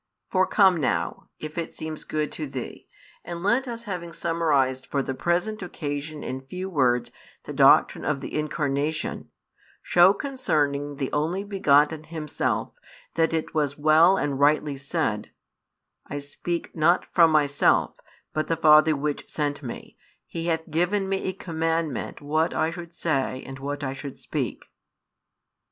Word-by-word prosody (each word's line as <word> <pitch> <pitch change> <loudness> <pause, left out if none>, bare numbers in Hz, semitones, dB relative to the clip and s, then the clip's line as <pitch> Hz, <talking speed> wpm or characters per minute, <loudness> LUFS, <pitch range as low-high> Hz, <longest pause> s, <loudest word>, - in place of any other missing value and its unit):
For 185 0 +3
come 190 -4 +5
now, 150 - -1
if 155 +2 -6
it 165 - -5
seems 155 -1 -6
good 150 -1 -2
to 155 - -5
thee, 130 -2 -7 0.4
and 170 0 -6
let 235 +6 +2
us, 235 -1 -5
having 175 -5 -5
summarized 145 -7 +1
for 140 -1 -1
the 135 - -3
present 175 +9 -1
occasion 150 -3 -5
in 130 +1 -4
few 185 +8 -6
words 125 -6 +2 0.3
the - - -7
doctrine - - +5
of 145 -2 0
the - - -7
Incarnation, 150 0 -2 0.5
shew 180 +3 +6
concerning 145 - -1
the 135 -2 -3
Only 165 +6 0
Begotten 155 -6 +3
Himself 155 -2 -2 0.4
that 165 -1 +2
it 160 -1 -2
was 145 -3 0
well 155 +5 +5
and 140 -5 -1
rightly 145 0 +3
said: 140 -6 -2 0.8
I 145 - -5
speak 145 +4 -5
not 170 +3 +3
from 170 -2 +6
Myself; 145 -2 +3 0.4
but 155 - -1
the 165 - 0
Father 155 0 +6
which 145 +1 -3
sent 145 -1 -2
Me, 125 -5 -8 0.3
He 165 0 -5
hath 160 -1 -1
given 180 +5 +1
Me 195 0 -1
a 190 - -1
commandment 165 - -2
what 155 +3 0
I 160 +1 +1
should 170 -1 -9
say 135 -6 -1
and 135 0 -8
what 145 +1 -4
I 130 -1 -2
should 135 0 -8
speak. - - -4
155 Hz, 150 wpm, -25 LUFS, 145-170 Hz, 0.8 s, shew